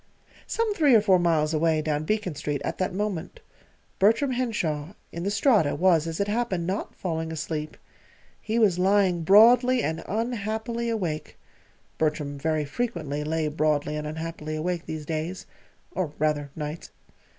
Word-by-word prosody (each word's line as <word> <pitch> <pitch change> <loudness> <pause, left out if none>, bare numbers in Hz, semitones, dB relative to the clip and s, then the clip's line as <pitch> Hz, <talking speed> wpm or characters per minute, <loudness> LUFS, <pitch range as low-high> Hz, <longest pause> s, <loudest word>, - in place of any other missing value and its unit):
Some 455 -2 0
three 295 -9 +4
or 220 - +6
four 190 -3 +4
miles 160 -3 +2
away 160 0 +2
down 150 0 -1
Beacon 210 -2 -1
Street 145 0 -3
at - - -3
that 185 +1 0
moment 195 -3 -3 0.6
Bertram 225 +8 +3
Henshaw, 185 -11 -2 0.2
in 170 - -6
the 195 - -1
Strata, 210 - +3
was, 170 -3 +3
as 165 -1 -4
it 200 - +1
happened, 205 -5 -1
not 190 +4 -3
falling 160 -3 -3
asleep. 155 -1 -4 0.6
He 225 +1 -2
was 200 -6 +3
lying 190 -2 +3
broadly 240 +7 +6
and 160 +1 -2
unhappily 225 +1 -2
awake 175 -9 -3 0.6
Bertram 150 -2 -1
very 155 0 0
frequently 150 - -3
lay 155 +1 -1
broadly 150 0 0
and 150 0 -4
unhappily 155 0 -5
awake 170 +2 -3
these 155 -1 -5
days 160 +4 -4 0.5
or 175 -5 -3
rather 150 -1 0
nights. 150 +1 -6
170 Hz, 150 wpm, -26 LUFS, 155-210 Hz, 0.6 s, or